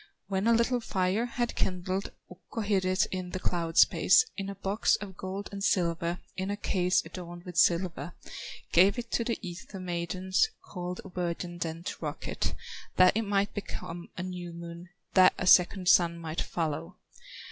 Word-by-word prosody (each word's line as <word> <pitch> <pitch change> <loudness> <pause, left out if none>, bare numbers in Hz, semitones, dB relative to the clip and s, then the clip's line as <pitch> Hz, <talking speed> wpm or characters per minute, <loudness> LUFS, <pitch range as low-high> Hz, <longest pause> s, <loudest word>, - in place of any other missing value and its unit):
When 195 +2 0
a 235 - +6
little 235 +2 +2
fire 200 +1 0
had 240 0 -2
kindled, 185 +1 -2 0.2
Ukko 185 +5 -7
hid 200 -3 +1
it 185 +2 +3
in 185 -1 -3
the 185 - -4
cloud 170 -2 -2
space, 445 - +6
In 195 -1 -4
a 200 - -5
box 195 +2 +1
of 195 -2 -7
gold 190 +2 -5
and 200 -1 -5
silver, 170 -2 +1 0.2
In 190 +1 -3
a 205 - -2
case 180 -3 +1
adorned 175 -1 -8
with 180 -2 -9
silver, 170 -2 +2 0.6
Gave 190 +6 +5
it 240 -1 -5
to 235 - +1
the 230 0 -1
ether 185 +3 -8
maidens, 185 - 0 0.2
Called 180 -1 -5
a - - -8
virgin 175 -1 -3
then 165 0 -4
to - - -4
rock - - -4
it, - - -2 0.4
That 185 +1 +6
it 225 0 0
might 200 0 +1
become 175 -4 -6
a 180 - -3
new 180 -2 -6
moon, 170 +1 -9 0.2
That 185 -1 +6
a - - -2
second 180 0 +5
sun 170 -1 +5
might 165 -1 -3
follow. 150 - -3
185 Hz, 180 wpm, -29 LUFS, 175-200 Hz, 0.6 s, a